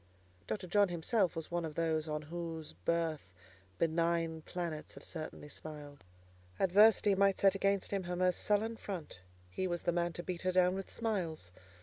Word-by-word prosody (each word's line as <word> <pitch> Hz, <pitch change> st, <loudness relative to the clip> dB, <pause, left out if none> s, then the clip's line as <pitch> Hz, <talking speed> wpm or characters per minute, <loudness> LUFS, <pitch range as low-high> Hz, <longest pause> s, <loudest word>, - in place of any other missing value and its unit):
Dr. 195 Hz, -3 st, -3 dB
John 200 Hz, +2 st, +3 dB
himself 175 Hz, +2 st, +1 dB
was 165 Hz, 0 st, -5 dB
one 175 Hz, 0 st, 0 dB
of 155 Hz, -2 st, -5 dB
those 160 Hz, -1 st, 0 dB
on 150 Hz, 0 st, -2 dB
whose 165 Hz, 0 st, -6 dB
birth 160 Hz, -, -2 dB, 0.4 s
benign 165 Hz, 0 st, +1 dB
planets 165 Hz, -2 st, -5 dB
have -, -, -11 dB
certainly 155 Hz, -2 st, -6 dB
smiled. 145 Hz, -1 st, -9 dB, 0.6 s
Adversity 205 Hz, +2 st, +6 dB
might 195 Hz, 0 st, +4 dB
set 195 Hz, -1 st, +5 dB
against 195 Hz, 0 st, +1 dB
him 200 Hz, -1 st, 0 dB
her 180 Hz, 0 st, -2 dB
most 180 Hz, 0 st, +2 dB
sullen 220 Hz, +2 st, +1 dB
front: 175 Hz, -, -6 dB, 0.3 s
he 185 Hz, -, -1 dB
was 175 Hz, -1 st, -2 dB
the 175 Hz, -, +2 dB
man 175 Hz, 0 st, 0 dB
to 175 Hz, -, -4 dB
beat 180 Hz, -2 st, -4 dB
her 185 Hz, -, +1 dB
down 180 Hz, 0 st, +4 dB
with 195 Hz, 0 st, -5 dB
smiles. 175 Hz, -, -2 dB
175 Hz, 175 wpm, -34 LUFS, 160-190 Hz, 0.6 s, Adversity